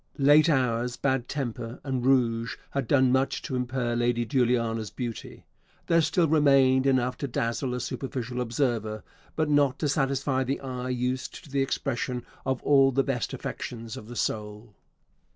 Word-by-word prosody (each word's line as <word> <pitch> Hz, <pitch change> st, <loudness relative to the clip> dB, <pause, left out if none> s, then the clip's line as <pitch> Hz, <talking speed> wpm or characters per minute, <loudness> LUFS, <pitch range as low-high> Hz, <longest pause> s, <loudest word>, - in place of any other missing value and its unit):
Late 145 Hz, +3 st, +6 dB
hours, 125 Hz, -4 st, +1 dB
bad 135 Hz, -3 st, 0 dB
temper, 120 Hz, -3 st, -4 dB
and 130 Hz, -3 st, -2 dB
rouge 115 Hz, -3 st, +2 dB
had 140 Hz, -3 st, -2 dB
done 130 Hz, -1 st, +4 dB
much 130 Hz, +1 st, +1 dB
to 130 Hz, -, -4 dB
impair 125 Hz, -1 st, -1 dB
Lady 120 Hz, 0 st, +1 dB
Juliana's 115 Hz, -4 st, +1 dB
beauty. 120 Hz, -3 st, -7 dB, 0.4 s
There 165 Hz, 0 st, +4 dB
still 165 Hz, +2 st, +2 dB
remained 140 Hz, -3 st, +4 dB
enough 130 Hz, -1 st, +1 dB
to 140 Hz, -, -3 dB
dazzle 120 Hz, +1 st, -2 dB
a -, -, -3 dB
superficial 125 Hz, -1 st, -4 dB
observer; 115 Hz, -3 st, -1 dB, 0.3 s
but 155 Hz, -1 st, +1 dB
not 145 Hz, -2 st, +3 dB
to 150 Hz, -, -1 dB
satisfy 135 Hz, -1 st, 0 dB
the 135 Hz, +2 st, -2 dB
eye 130 Hz, -1 st, -5 dB
used 125 Hz, +1 st, -3 dB
to 145 Hz, -, -15 dB
the 140 Hz, 0 st, +1 dB
expression 125 Hz, -2 st, -2 dB, 0.2 s
of 130 Hz, -1 st, -1 dB
all 135 Hz, -2 st, +5 dB
the 135 Hz, +1 st, +2 dB
best 130 Hz, -4 st, -2 dB
affections 115 Hz, -2 st, -6 dB
of 105 Hz, -, -9 dB
the 120 Hz, -, -9 dB
soul. 105 Hz, 0 st, -3 dB
130 Hz, 160 wpm, -27 LUFS, 120-135 Hz, 0.4 s, Late